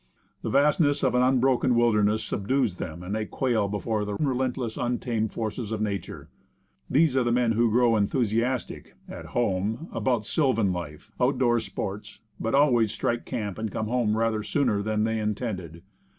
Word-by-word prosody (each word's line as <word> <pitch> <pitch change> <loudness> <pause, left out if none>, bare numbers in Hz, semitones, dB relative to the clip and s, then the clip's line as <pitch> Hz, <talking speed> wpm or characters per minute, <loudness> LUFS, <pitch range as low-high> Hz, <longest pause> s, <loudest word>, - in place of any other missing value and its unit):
The - - -3
vastness 145 0 +3
of 130 - +2
an 125 - +3
unbroken 130 -1 +3
wilderness 110 -2 +3
subdues 110 -1 -1
them, 85 +1 -6
and 95 +3 -5
they 110 0 -2
quail 120 -6 0
before 105 +1 -2
the 105 0 -3
relentless, 130 -3 -1
untamed 120 -3 -1
forces 110 0 -4
of 110 - -2
nature. 100 -4 -4 0.6
These 150 -1 +3
are 130 - +3
the 120 - 0
men 120 -1 +2
who 115 +1 +2
grow 120 +1 +3
enthusiastic 115 +3 -1
at - - -8
' - - 0
home 110 - -1
about 120 -5 0
sylvan 115 - +1
life, 85 +3 -7
out 130 +2 +2
door 120 -2 +3
sports, 105 -2 -6 0.2
but 115 +4 0
always 120 -7 +4
strike 120 0 -2
camp 105 -6 -4
and 110 -2 -3
come 110 - -2
home 115 -3 +1
rather 115 -1 +1
sooner 115 -3 0
than 105 +1 0
they 110 0 0
intended. 100 -6 -4
115 Hz, 170 wpm, -26 LUFS, 105-125 Hz, 0.6 s, always